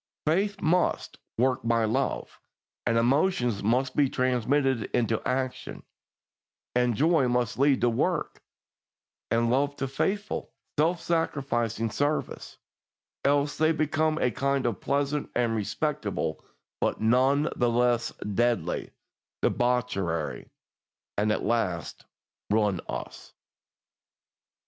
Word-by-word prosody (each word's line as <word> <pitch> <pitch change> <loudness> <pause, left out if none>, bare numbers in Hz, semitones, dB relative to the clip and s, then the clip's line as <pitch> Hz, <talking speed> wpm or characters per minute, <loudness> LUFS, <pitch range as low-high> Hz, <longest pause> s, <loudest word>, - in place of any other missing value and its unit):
Faith 195 +6 +1
must 180 +1 0 0.2
"work 130 +2 +2
by 115 -1 +2
love," 130 +5 -2 0.5
and 115 - +2
emotion 125 +1 +2
must 130 +4 +1
be 140 -2 +3
transmitted 130 -1 +1
into 115 -2 +1
action, 130 0 -3 0.9
and 125 -1 +2
joy 155 0 +3
must 120 -1 0
lead 140 -1 +4
to 120 - +4
work, 115 - -1 0.9
and 115 0 +2
love 140 +3 +1
to 135 - -3
faithful, 200 +10 -2 0.3
self 165 +3 +3
sacrificing 125 -10 -1
service, 145 +5 -2 0.7
else 145 +1 +2
they 155 +1 +4
become 155 0 +1
a 125 - +1
kind 140 +2 0
of 115 -6 -1
pleasant 140 +1 -1
and 120 -2 +1
respectable, 105 -3 -2 0.4
but - - 0
none 130 +7 +3
the 120 -1 +2
less 120 0 +2 0.2
deadly, 115 -6 0 0.5
debauchery, 105 -11 0 0.7
and 105 +1 +1
at - - -1
last 100 -8 -1 0.4
ruin 105 -4 +2
us. - - -7
125 Hz, 110 wpm, -27 LUFS, 115-145 Hz, 0.9 s, lead